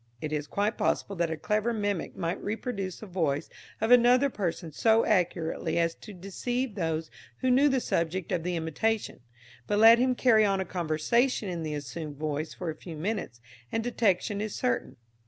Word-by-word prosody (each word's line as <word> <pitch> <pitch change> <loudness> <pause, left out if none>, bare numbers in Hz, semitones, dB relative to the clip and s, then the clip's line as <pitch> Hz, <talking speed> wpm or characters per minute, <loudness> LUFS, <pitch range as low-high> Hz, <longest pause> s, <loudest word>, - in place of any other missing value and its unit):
It 155 +3 -4
is 150 -1 -2
quite 205 +5 -1
possible 200 - 0
that 170 -1 +1
a 160 - -3
clever 215 +7 0
mimic 205 -5 -2
might 170 +1 -3
reproduce 205 -3 -3
the - - -6
voice 165 -7 -1 0.3
of 220 +2 0
another 245 +3 +6
person 175 -5 -3
so 225 +8 +3
accurately 175 -6 0
as 165 -1 +2
to 215 - -12
deceive 220 +6 -3
those 160 -4 -2 0.3
who 255 - +2
knew 275 +4 +5
the 265 -1 +2
subject 170 -4 -1
of 170 - 0
the 180 +1 -2
imitation; 170 +7 -1 0.5
but 205 - +1
let 225 +2 +8
him 255 0 +2
carry 230 -4 +5
on 195 -2 +2
a 190 - -1
conversation 185 - 0
in 175 -2 -3
the 155 -2 -3
assumed 145 +2 -6
voice 155 +1 -3
for 175 -3 -4
a - - -9
few 165 -2 -9
minutes, 165 - -3 0.3
and 225 - -1
detection 205 -3 +1
is 215 -1 -4
certain. 120 -1 -1
190 Hz, 185 wpm, -28 LUFS, 160-225 Hz, 0.5 s, let